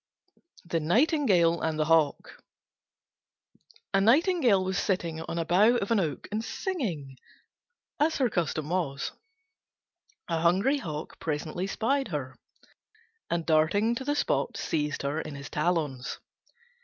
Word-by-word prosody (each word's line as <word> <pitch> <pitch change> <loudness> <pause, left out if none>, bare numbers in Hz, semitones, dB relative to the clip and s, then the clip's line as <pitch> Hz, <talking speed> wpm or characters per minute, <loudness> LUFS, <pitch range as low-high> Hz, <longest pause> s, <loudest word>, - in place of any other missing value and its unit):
THE 170 -1 -1
NIGHTINGALE 180 - +3
AND 160 -1 -1
THE 155 - +1
HAWK 160 -2 +1 1.5
A 195 - +4
Nightingale 250 - +4
was 190 0 -1
sitting 170 -4 -1
on 165 +1 -5
a 165 - -1
bough 200 +8 +4
of 205 -2 -1
an 225 - +4
oak 155 -7 -3
and 215 +2 -2
singing, 230 - -4 0.8
as 315 +2 +2
her 260 - +3
custom 155 -6 -2
was. 155 -6 -1 1.2
A 165 -2 -1
hungry 195 - +3
Hawk 155 - -6
presently 160 +4 -3
spied 270 +7 0
her, 145 -7 -4 0.9
and 170 -1 -1
darting 170 +8 +3
to 240 - -4
the 290 +2 0
spot - - 0
seized 150 -3 -2
her 145 +3 -1
in 155 -2 -7
his 140 0 -9
talons. 150 -5 -1
170 Hz, 130 wpm, -28 LUFS, 155-230 Hz, 1.5 s, A